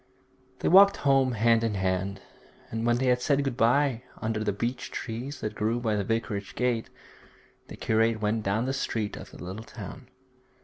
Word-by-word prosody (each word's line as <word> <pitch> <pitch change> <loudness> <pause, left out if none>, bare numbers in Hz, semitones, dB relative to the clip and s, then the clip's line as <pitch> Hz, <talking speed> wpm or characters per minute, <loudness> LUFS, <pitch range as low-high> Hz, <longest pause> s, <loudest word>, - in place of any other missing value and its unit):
They - - 0
walked 200 +2 +7
home 135 -2 +3
hand 115 +1 +3
in 110 -3 0
hand, 95 +1 -1 0.5
and 115 +1 -2
when 120 0 +3
they 130 - 0
had 125 -1 +3
said 140 +2 +2
good 135 -3 -2
bye 125 +1 +3 0.2
under 110 -1 -2
the 105 - +1
beech 120 +5 -3
trees 125 +5 -5
that 105 - -3
grew 110 +3 0
by 110 -3 0
the 100 - 0
vicarage 105 -2 -3
gate, 125 -2 0 0.8
the - - -10
curate 110 0 +2
went 110 +1 0
down 110 +4 0
the 135 - -1
street 110 -5 -2
of - - -9
the - - -13
little 95 +5 -6
town. 120 +3 -9
115 Hz, 185 wpm, -27 LUFS, 105-125 Hz, 0.8 s, walked